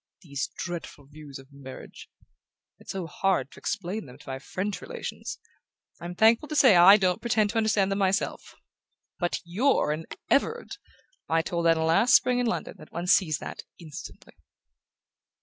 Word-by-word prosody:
These 140 -4 -3
dreadful 170 -5 -6
views 145 -1 -11
of 135 +1 -16
marriage... 135 -2 -11 0.7
it's - - -9
so 190 -2 -4
hard 165 -4 -1
to - - -14
explain 205 -2 -4
them 125 0 -13
to 145 - -14
my 130 0 -4
French 190 +8 -4
relations...I'm 180 - -9
thankful 225 +8 +4
to 305 - -4
say 260 -9 +6
I 180 +4 +9
don't 185 -3 0
pretend 215 -3 +1
to 230 - -3
understand 215 -3 +2
them 195 - -1
myself! 195 +1 -1 0.6
But 175 -2 -1
YOU'RE 200 - +1
an 155 +2 -4 0.2
Everard 455 +13 0 0.5
I 165 0 +2
told 170 0 -1
Anna 165 -1 +3
last 225 +11 +4
spring 250 0 +3
in 245 - +1
London 230 - -3
that - - -14
one 175 - -4
sees 175 -5 +3
that - - -7 0.2
instantly"... 165 0 -11
180 Hz, 160 wpm, -27 LUFS, 160-215 Hz, 0.7 s, I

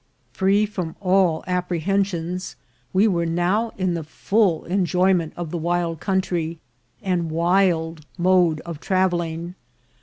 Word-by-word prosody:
Free 195 +2 +3
from 185 -6 -5
all 185 -4 +2
apprehensions, 180 0 -1 0.4
we 195 +4 +4
were 170 -4 +1
now 180 +7 +1
in 185 -2 0
the 165 -1 -3
full 185 +2 +1
enjoyment 180 -2 +1
of 170 -3 -5
the 175 - -2
wild 170 -1 -1
country 175 -4 -1 0.5
and 180 -4 0
wild 165 -1 +1
mode 175 -3 +3
of 170 -4 -7
trav 185 +1 +2
elling. 170 0 -3
175 Hz, 125 wpm, -22 LUFS, 165-190 Hz, 0.5 s, we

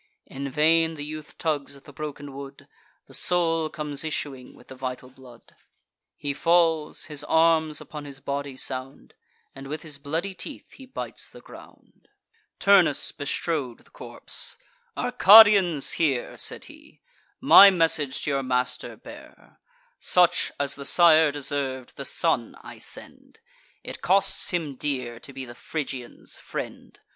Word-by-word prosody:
In 140 +1 -6
vain 160 +3 +3
the 145 -1 -6
youth 155 0 -9
tugs 145 -3 -2
at 140 - -16
the 145 - -14
broken 145 -1 -7
wood; 140 0 -10 0.4
The - - -18
soul 165 -3 0
comes 150 -2 -5
issuing 140 -4 -5
with - - -19
the - - -9
vital 130 0 -6
blood: 125 -3 -17 0.6
He 145 -1 -4
falls; 165 0 +1
his 150 -2 -5
arms 160 -2 +2
upon 150 -1 -9
his 140 -1 -10
body 140 -1 -5
sound; 130 +1 -6 0.4
And 135 0 -10
with 150 +2 -6
his 150 -3 -8
bloody 165 +7 -3
teeth 275 - -9
he 265 - -14
bites 260 - -6
the - - -14
ground. - - -17 0.5
Turnus 195 -7 +4
bestrode 145 -3 -3
the - - -24
corpse: - - -4 0.4
"Arcadians, 205 - +6
hear," 140 -7 0
Said - - -3
he; - - -16 0.4
"my 200 - +9
message 160 -6 +1
to 145 - -1
your 135 -1 0
master 125 -1 -2
bear: - - -15 0.4
Such 180 -1 +3
as 140 -1 +1
the 140 - -5
sire 160 -2 +5
deserv'd, 135 -3 -3
the - - -6
son - - 0
I - - -11
send; - - -10 0.4
It - - -8
costs 195 +1 +1
him 160 -7 -3
dear 125 -5 -3
to 135 - -9
be 135 -1 -7
the 120 - -10
Phrygians' 130 -2 -7
friend. - - -8
145 Hz, 145 wpm, -25 LUFS, 135-165 Hz, 0.6 s, my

